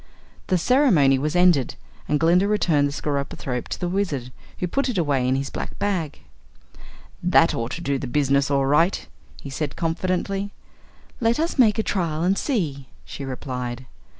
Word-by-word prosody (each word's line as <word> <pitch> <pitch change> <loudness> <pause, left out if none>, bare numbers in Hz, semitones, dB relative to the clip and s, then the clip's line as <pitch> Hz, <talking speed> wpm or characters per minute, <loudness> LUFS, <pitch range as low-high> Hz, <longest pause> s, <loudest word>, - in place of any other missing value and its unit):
The 185 - +2
ceremony 175 - +4
was 150 +4 -2
ended 175 -8 +3 0.3
and 150 - +2
Glinda 175 +4 +4
returned 165 -9 +2
the - - -4
skeropythrope 140 -3 -3
to - - -5
the 180 - -2
Wizard, 175 -10 -2 0.3
who - - -2
put 275 +10 -1
it 235 - -2
away 140 -7 +1
in 130 - +2
his 135 +1 -3
black - - -6
bag. 180 -7 -2 1.0
"That 175 -2 +4
ought 115 0 -2
to 170 - -5
do 140 -4 -1
the 135 - -4
business 140 +1 +2
all 140 -1 +2
right," 165 +7 +2 0.4
he 140 - -7
said 140 +1 -3
confidently. 185 +4 -2 0.7
"Let 230 +2 +1
us 325 -2 -1
make 220 -4 +5
a 220 - +1
trial 165 -6 -1
and 185 +2 +3
see," 155 - -2 0.2
she 140 - -7
replied. 125 -1 -5
160 Hz, 170 wpm, -23 LUFS, 140-190 Hz, 1.0 s, make